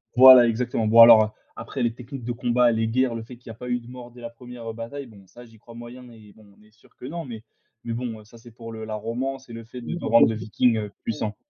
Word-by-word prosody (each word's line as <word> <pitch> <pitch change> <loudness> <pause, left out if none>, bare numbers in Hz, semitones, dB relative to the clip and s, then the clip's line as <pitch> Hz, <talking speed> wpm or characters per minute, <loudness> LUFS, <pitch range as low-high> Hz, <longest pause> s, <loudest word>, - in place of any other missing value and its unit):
voilà 130 -1 +9
exactement. 115 0 -2
Bon 115 +2 +7
alors, 110 -2 +7 0.2
après 115 +4 -7
les 115 -1 0
techniques 125 +1 -10
de 120 - -4
combat, 120 0 +2
les 110 0 -1
guerres, 125 +1 0
le 115 - -6
fait 120 +1 -13
qu'il 120 -1 -16
y - - -6
a - - -9
pas 125 +2 -9
eu 125 0 -1
de 120 - -17
mort 125 -1 -11
dès 120 - -15
la 115 - -7
première, 120 -1 -11
heu, - - -6
bataille, 115 +5 -8
bon 100 -4 -17
ça 120 +6 -15
j'y 115 -1 -19
crois 115 +1 -16
moyen 120 +2 -11
et 105 -3 -17
bon, 110 - -19
on - - -24
est 105 - -24
sûr 110 - -27
que - - -11
non, 165 +4 -6
mais 115 -4 -9 0.4
mais 115 - -4
bon, 115 -2 -5
heu, - - -17
ça, 115 +2 -17
c'est 120 +1 -16
pour 115 0 -11
le 110 -1 -8
la 110 0 -5
romance 125 +4 -5
et - - -10
le 115 0 -8
fait 125 +2 -10
de 120 - -5
de 175 - -7
rendre 115 +1 +5
le 110 - -2
Viking, 110 +2 0
heu, 105 -2 -5
puissant. 110 -1 -4
115 Hz, 300 wpm, -23 LUFS, 110-125 Hz, 0.4 s, voilà